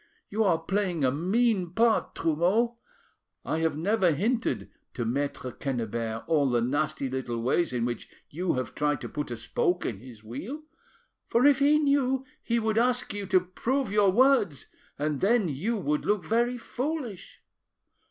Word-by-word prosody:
You 220 +2 +1
are 175 -4 +4
playing 180 -1 -1
a 130 - +3
mean 185 - +1
part, 230 0 +2
Trumeau. 185 +9 +1 0.7
I 160 - -1
have 160 -2 0
never 190 +3 +2
hinted 225 - -1 0.2
to 120 - -2
Maitre 130 +1 -2
Quennebert 115 -4 -3
all 145 -4 +2
the 120 -1 +2
nasty 140 +3 -1
little 125 -2 -3
ways 130 +8 +1
in 120 -2 -1
which 120 -2 -4 0.2
you 175 +4 -1
have 130 -1 -3
tried 145 -2 0
to - - -6
put 150 -2 -4
a 120 - -4
spoke 175 +10 0
in 105 -5 -3
his 115 -2 -13
wheel, 195 - -6 0.6
for 240 +3 +3
if 285 -2 +6
he 290 +2 +5
knew 275 -3 +2 0.2
he 235 - 0
would 220 -1 +1
ask 250 -1 +1
you 205 -1 -4
to 185 -1 +4
prove 230 +7 -2
your 205 -1 +4
words, 220 - +3 0.3
and 150 -1 -2
then 215 0 +3
you 195 - -1
would 150 -6 -1
look 210 -3 0
very 240 +2 +1
foolish.". 250 - -5
180 Hz, 165 wpm, -27 LUFS, 140-235 Hz, 0.7 s, if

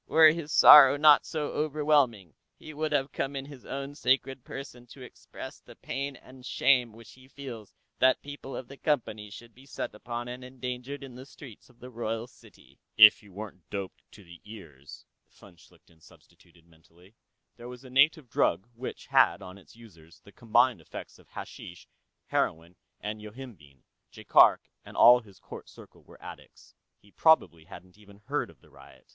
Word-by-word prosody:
"Were 160 -1 +6
his 160 -2 -6
sorrow 140 -1 +8
not 150 0 +5
so 150 -2 -4
overwhelming, 145 - 0 0.2
he 155 - -12
would 155 +1 -3
have 140 -1 -1
come 140 +1 -4
in 135 0 -5
His 140 -3 -14
Own 140 +1 -6
Sacred 130 -1 -1
Person 125 -3 -10
to 130 +2 -13
express 125 - -11
the - - -17
pain 140 +1 -5
and 130 +1 -17
shame 125 -1 +1
which 110 -2 -15
he 130 0 -19
feels 125 -7 -10 0.3
that 130 0 +3
people 145 -1 -9
of 130 - -8
the 140 - -13
Company 110 -9 -2
should 115 +3 -13
be 130 +4 -19
set - - -6
upon 120 +2 -7
and 125 +1 -8
endangered 125 +2 -7
in 135 -2 -11
the 130 +2 -11
streets 130 -6 -15
of 120 -1 -25
the 125 +1 -12
royal 115 -1 -4
city." 125 - -21 0.2
If 110 -1 +9
he 105 - -19
weren't 95 -4 -11
doped 100 -2 -7
to 105 - -15
the 85 -1 -16
ears, 80 -10 -13 0.2
von 95 -3 -19
Schlichten 80 0 -24
substituted 85 +1 -23
mentally. 85 +3 -24 0.4
There 120 0 -10
was 125 +1 -12
a 130 - -13
native 145 +2 +3
drug 95 -3 0
which 120 +2 -8
had, 100 - +2
on 95 +1 -11
its 100 - -20
users, 85 -7 -18
the 100 - -18
combined 120 +2 +1
effects - - -11
of - - -22
hashish, 85 0 -11 0.4
heroin 85 +2 -2 0.2
and 105 +1 -6
yohimbine; 105 - -13 0.3
Jaikark - - +4 0.2
and - - -13
all 125 +1 +7
his 100 -5 -18
court - - -12
circle - - -17
were - - -19
addicts. - - -14 0.2
He 100 - -25
probably 90 - +2
hadn't 95 +1 -15
even 100 -1 -18
heard - - -3
of - - -20
the - - -23
riot. - - -18
120 Hz, 180 wpm, -28 LUFS, 100-135 Hz, 0.4 s, If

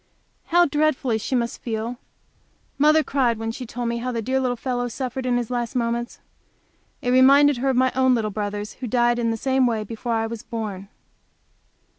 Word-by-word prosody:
How 350 +1 +4
dreadfully 295 -6 +1
she 255 - -2
must 235 -1 -2
feel! 230 +1 -4 0.8
Mother 305 +2 +5
cried 250 -6 +1
when 225 0 -3
she 250 +1 -7
told 240 +1 -4
me 235 0 -1
how 250 +2 -3
the 230 -2 -3
dear 260 +3 0
little 250 -2 0
fellow 245 0 -2
suffered 255 +1 -4
in 245 -1 +2
his 240 0 -3
last 240 -1 -2
moments. 235 0 -2 0.8
It 245 - +1
reminded 275 +2 +6
her 270 +3 0
of 260 - +1
my 260 0 +3
little 250 -5 +2
brothers 205 0 -4
who 255 - -7
died 240 +1 +2
in 230 -1 0
the 225 - -1
same 265 +1 +2
way, 225 -2 0
just 210 - -9
before 230 +1 -3
I 225 0 0
was 225 -1 -6
born. 205 -4 -5
245 Hz, 195 wpm, -23 LUFS, 225-260 Hz, 0.8 s, reminded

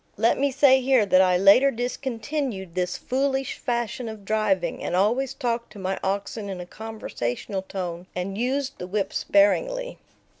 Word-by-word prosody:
Let 225 +5 +2
me 280 +1 +2
say 265 -1 +5
here 255 -4 +3
that 185 -1 +5
I 180 -1 +4
later 200 +9 +6
discontinued 245 - -3
this 180 0 -1
foolish 270 0 -1
fashion 235 -1 -2
of 215 -2 -9
driving, 195 -5 0
and - - -2
always 235 +8 +1
talked 235 -3 -2
to - - -12
my 190 0 -3
oxen 200 +2 -2
in 190 -2 -5
a 180 - -6
conversational 200 - -4
tone 180 -2 -5
and 185 +2 -3
used 265 +4 -2
the 180 - -5
whip 200 +1 -2
sparingly. - - +1
215 Hz, 160 wpm, -25 LUFS, 190-260 Hz, -, later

